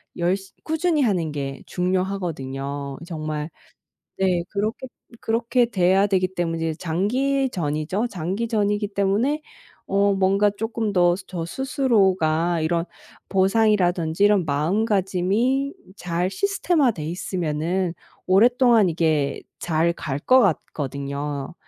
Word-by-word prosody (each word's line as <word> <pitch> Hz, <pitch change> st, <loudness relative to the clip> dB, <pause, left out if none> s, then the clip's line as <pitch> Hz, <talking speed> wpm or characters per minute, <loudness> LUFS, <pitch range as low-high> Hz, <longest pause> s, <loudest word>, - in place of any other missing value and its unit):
열시 190 Hz, +2 st, -1 dB
꾸준히 320 Hz, 0 st, +1 dB
하는 180 Hz, -, 0 dB
게 135 Hz, -2 st, -4 dB
중요하거든요. 145 Hz, -7 st, -3 dB
정말 155 Hz, -2 st, -4 dB, 0.7 s
네 185 Hz, -2 st, +2 dB
그렇게 215 Hz, +5 st, -2 dB, 0.4 s
그렇게 235 Hz, +2 st, +1 dB
돼야 190 Hz, -3 st, +3 dB
되기 185 Hz, -2 st, +1 dB
때문에 165 Hz, -2 st, -1 dB
장기전이죠. 195 Hz, -, -1 dB
장기전이기 205 Hz, +3 st, -1 dB
때문에 210 Hz, +10 st, +1 dB, 0.5 s
어 200 Hz, +1 st, +2 dB
뭔가 195 Hz, +2 st, +3 dB
쪼끔 220 Hz, +1 st, -3 dB
더 175 Hz, -2 st, +4 dB
저 170 Hz, -3 st, -5 dB
스스로가 190 Hz, -, +1 dB
이런 165 Hz, +1 st, 0 dB, 0.5 s
보상이라든지 190 Hz, -4 st, +2 dB
이런 205 Hz, -3 st, +4 dB
마음가짐이 200 Hz, -, +1 dB, 0.2 s
잘 175 Hz, 0 st, -1 dB
시스템화 350 Hz, -, +1 dB
돼 170 Hz, -9 st, -6 dB
있으면은 170 Hz, 0 st, -2 dB, 0.3 s
오랫동안 230 Hz, +1 st, +5 dB
이게 155 Hz, -4 st, 0 dB, 0.2 s
잘 165 Hz, 0 st, +1 dB
갈 140 Hz, -5 st, -4 dB
것 255 Hz, -, +5 dB
같거든요. 140 Hz, -, -2 dB
185 Hz, 255 characters per minute, -23 LUFS, 165-215 Hz, 0.7 s, 오랫동안